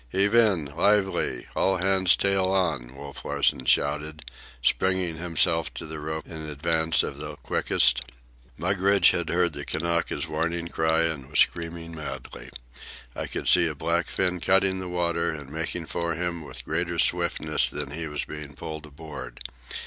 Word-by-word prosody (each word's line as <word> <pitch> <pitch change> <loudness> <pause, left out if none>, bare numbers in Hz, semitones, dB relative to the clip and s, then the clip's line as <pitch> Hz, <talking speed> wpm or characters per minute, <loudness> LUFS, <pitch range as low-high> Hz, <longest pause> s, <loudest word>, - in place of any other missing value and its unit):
"Heave 100 - +1
in! 105 -9 +4
Lively! 90 -4 +1
All 95 0 +2
hands 95 0 +4
tail 95 -1 +2
on!" 85 -10 0
Wolf 70 0 -9
Larsen 70 -2 +2
shouted, 75 +4 +1 0.4
springing 95 -1 +1
himself 85 -1 +1
to - - -6
the 80 0 -6
rope 80 +1 -4
in 80 -2 -8
advance 80 +2 +1
of 70 - -5
the 75 0 -6
quickest. 60 -3 +1 0.6
Mugridge 95 +2 +4
had 85 -2 -2
heard 85 -1 +1
the 70 0 -6
Kanaka's 85 +3 -1
warning 85 +2 -2
cry 80 0 +2
and 75 -5 -2
was 75 - +2
screaming 85 0 -1
madly. 70 -5 -7 0.7
I - - -4
could - - -5
see - - +6
a - - -4
black 85 +1 -1
fin 90 -1 0
cutting 95 +1 +2
the 90 -1 -5
water 85 -1 0
and 75 -4 -6
making 80 +2 -3
for 85 0 -2
him 85 0 -2
with 75 - -6
greater 85 0 -1
swiftness 85 +2 +2
than 70 - -4
he 80 +2 -3
was 75 -1 -2
being 75 -2 -8
pulled 80 +1 -7
aboard. 75 +1 -9
85 Hz, 160 wpm, -26 LUFS, 75-90 Hz, 0.7 s, see